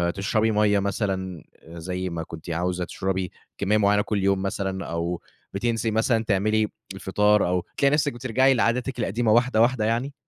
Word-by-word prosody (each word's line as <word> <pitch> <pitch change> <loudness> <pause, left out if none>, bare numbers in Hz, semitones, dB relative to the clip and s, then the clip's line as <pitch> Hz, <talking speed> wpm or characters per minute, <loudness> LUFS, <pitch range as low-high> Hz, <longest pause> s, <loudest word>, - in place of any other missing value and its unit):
تشربي 110 +3 +1
مَيَّة 105 -1 +3
مثلًا 95 -4 -2 0.2
زي 90 +3 -4
ما 85 -1 -4
كنتِ 80 +1 -10
عاوزة 90 +2 -1
تشربي 95 0 -3 0.3
كمية 100 +2 +2
معينة 105 0 +3
كل 105 -2 -2
يوم 95 0 +2
مثلًا 95 -1 -3
أو 85 +1 -3 0.3
بتنسي 115 +2 -1
مثلًا 110 +1 +1
تعملي 110 +1 +1 0.3
الفطار 105 -2 +2
أو 90 0 0
تلاقي 140 0 +3
نفسِك 145 -1 +1
بترجعي 130 +2 +2
لعاداتِك 125 +2 0
القديمة 110 +3 0
واحدة 120 0 +3
واحدة 120 -2 +2
يعني؟ 120 +5 -1
105 Hz, 160 wpm, -24 LUFS, 95-115 Hz, 0.3 s, مَيَّة